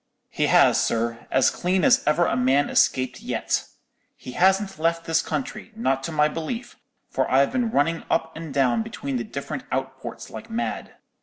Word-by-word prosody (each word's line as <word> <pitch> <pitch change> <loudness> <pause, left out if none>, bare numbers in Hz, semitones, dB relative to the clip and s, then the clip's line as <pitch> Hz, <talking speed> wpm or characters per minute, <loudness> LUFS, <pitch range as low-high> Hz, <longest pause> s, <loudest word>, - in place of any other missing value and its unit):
"He - - 0
has, - - +5
sir; 115 0 -2
as 130 - +3
clean 185 0 0
as - - +5
ever 160 +3 +3
a - - 0
man 130 +3 +2
escaped 130 -1 +2
yet. - - -1 0.5
He 125 - -9
hasn't 190 +3 +2
left 165 +1 0
this 165 0 +2
country, 215 -4 -5
not 135 - 0
to - - -4
my 150 -1 +3
belief, 165 +11 -5 0.4
for - - 0
I've 135 +2 +3
been 245 -3 0
running 165 -2 +1
up 160 0 0
and 160 -2 -7
down 125 -4 +2
between 135 +3 -4
the 120 - -2
different 110 - -6
outports - - -5
like 225 - -9
mad. 230 +1 -4
160 Hz, 175 wpm, -24 LUFS, 130-185 Hz, 0.5 s, has